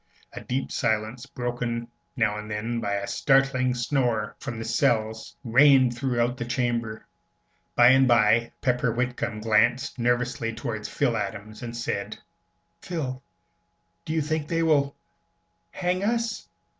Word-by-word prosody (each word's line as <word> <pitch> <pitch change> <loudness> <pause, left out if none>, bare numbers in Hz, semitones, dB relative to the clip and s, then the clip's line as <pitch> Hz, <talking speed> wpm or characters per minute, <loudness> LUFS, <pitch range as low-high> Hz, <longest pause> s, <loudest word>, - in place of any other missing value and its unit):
A - - -7
deep 130 +2 -3
silence, 110 +4 -1
broken 120 -2 -3 0.3
now 110 -4 +1
and 105 0 -8
then 115 +3 -2
by 100 -3 -2
a 100 0 -1
startling 135 0 +2
snore 120 -4 0
from 125 -5 -5
the 115 - -5
cells, 110 -1 0
reigned 130 0 +5
throughout 120 0 0
the 120 - -4
chamber. 120 -3 -2 0.7
By 120 0 +7
and 130 0 +5
by 115 -1 +4
Pepper 125 -1 +1
Whitcomb 120 -2 -2
glanced 115 +4 +2
nervously 120 -1 0
towards 115 -2 -5
Phil - - 0
Adams 110 0 -5
and 120 -1 -6
said, 120 - -3 0.6
"Phil, 135 -7 -4 0.8
do 160 - -4
you 160 -2 +1
think 155 0 -2
they 165 +1 0
will 140 -3 +2 0.7
hang 180 +1 -1
us?" 230 +1 -1
120 Hz, 135 wpm, -26 LUFS, 115-135 Hz, 0.8 s, By